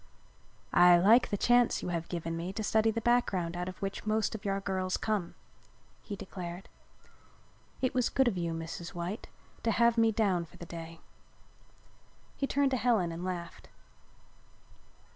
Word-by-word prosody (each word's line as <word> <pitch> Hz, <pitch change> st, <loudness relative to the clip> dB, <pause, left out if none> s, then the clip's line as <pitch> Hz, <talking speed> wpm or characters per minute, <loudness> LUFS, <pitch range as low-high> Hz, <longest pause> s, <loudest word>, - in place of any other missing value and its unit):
"I 175 Hz, 0 st, +7 dB
like 220 Hz, +8 st, +5 dB
the 205 Hz, -, -1 dB
chance 240 Hz, +2 st, +3 dB
you -, -, -3 dB
have 170 Hz, -1 st, -3 dB
given 165 Hz, -1 st, -3 dB
me 170 Hz, +3 st, -4 dB
to 215 Hz, -, -3 dB
study 220 Hz, +1 st, +3 dB
the 230 Hz, +1 st, -1 dB
background 190 Hz, -8 st, +1 dB
out 180 Hz, +1 st, -3 dB
of 185 Hz, -, -10 dB
which 195 Hz, 0 st, -3 dB
most 215 Hz, 0 st, +1 dB
of 215 Hz, -2 st, -7 dB
our 195 Hz, 0 st, 0 dB
girls 190 Hz, -1 st, -1 dB
come," 210 Hz, -6 st, -2 dB, 0.7 s
he 205 Hz, -, -6 dB
declared. 185 Hz, -2 st, -7 dB, 1.2 s
"It 255 Hz, -, +1 dB
was 250 Hz, -3 st, +1 dB
good 265 Hz, -2 st, +2 dB
of 230 Hz, -, +1 dB
you, 170 Hz, -2 st, -2 dB
Mrs. 165 Hz, +2 st, -6 dB
White, 175 Hz, +5 st, -4 dB, 0.3 s
to 230 Hz, -, 0 dB
have 235 Hz, +1 st, +3 dB
me 225 Hz, 0 st, +4 dB
down 195 Hz, -6 st, +1 dB
for 160 Hz, -, -18 dB
the 170 Hz, -, -9 dB
day." 165 Hz, -1 st, -9 dB, 1.3 s
He 275 Hz, -, -1 dB
turned 280 Hz, 0 st, +2 dB
to 260 Hz, -, +1 dB
Helen 220 Hz, -7 st, +2 dB
and 165 Hz, +2 st, -6 dB
laughed. 175 Hz, -2 st, -6 dB
195 Hz, 165 wpm, -31 LUFS, 175-225 Hz, 1.3 s, I